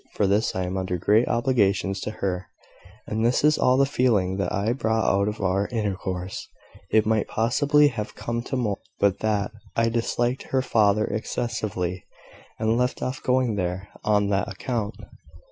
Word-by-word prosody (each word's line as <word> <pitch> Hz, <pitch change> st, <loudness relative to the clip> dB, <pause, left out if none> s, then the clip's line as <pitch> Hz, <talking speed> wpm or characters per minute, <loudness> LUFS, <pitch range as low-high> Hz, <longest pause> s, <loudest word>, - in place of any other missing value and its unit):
For 105 Hz, -, +2 dB
this 105 Hz, +3 st, +1 dB
I 95 Hz, -, -1 dB
am 90 Hz, +1 st, -3 dB
under 95 Hz, -1 st, -2 dB
great 105 Hz, +7 st, +3 dB
obligations 100 Hz, -5 st, +1 dB
to -, -, -4 dB
her; 95 Hz, -4 st, -3 dB, 0.6 s
and 110 Hz, +1 st, -2 dB
this 120 Hz, +4 st, +2 dB
is 150 Hz, 0 st, +4 dB
all 125 Hz, 0 st, +4 dB
the 140 Hz, -, +5 dB
feeling 105 Hz, -9 st, +1 dB
that 100 Hz, -3 st, -1 dB
I 105 Hz, +3 st, 0 dB
brought 110 Hz, -3 st, 0 dB
out 100 Hz, +1 st, +2 dB
of 105 Hz, +1 st, -3 dB
our 95 Hz, +1 st, +1 dB
intercourse. 95 Hz, -5 st, -3 dB, 0.4 s
It 110 Hz, 0 st, +3 dB
might 110 Hz, -1 st, +1 dB
possibly 145 Hz, +6 st, +3 dB
have 105 Hz, -5 st, -5 dB
come 115 Hz, 0 st, -3 dB
to -, -, -3 dB
more, 105 Hz, -6 st, -1 dB, 0.2 s
but 100 Hz, -1 st, +2 dB
that 105 Hz, -2 st, 0 dB, 0.2 s
I 115 Hz, 0 st, +2 dB
disliked 120 Hz, +2 st, -1 dB
her 130 Hz, -1 st, +1 dB
father 105 Hz, -3 st, +3 dB
excessively, 110 Hz, -5 st, -3 dB, 0.5 s
and 110 Hz, +1 st, +1 dB
left 125 Hz, +1 st, 0 dB
off 130 Hz, +1 st, -3 dB
going 125 Hz, -4 st, +1 dB
there 90 Hz, +1 st, -3 dB
on 105 Hz, -1 st, +2 dB
that 100 Hz, +2 st, 0 dB
account. 110 Hz, +1 st, -3 dB
110 Hz, 170 wpm, -25 LUFS, 100-120 Hz, 0.6 s, the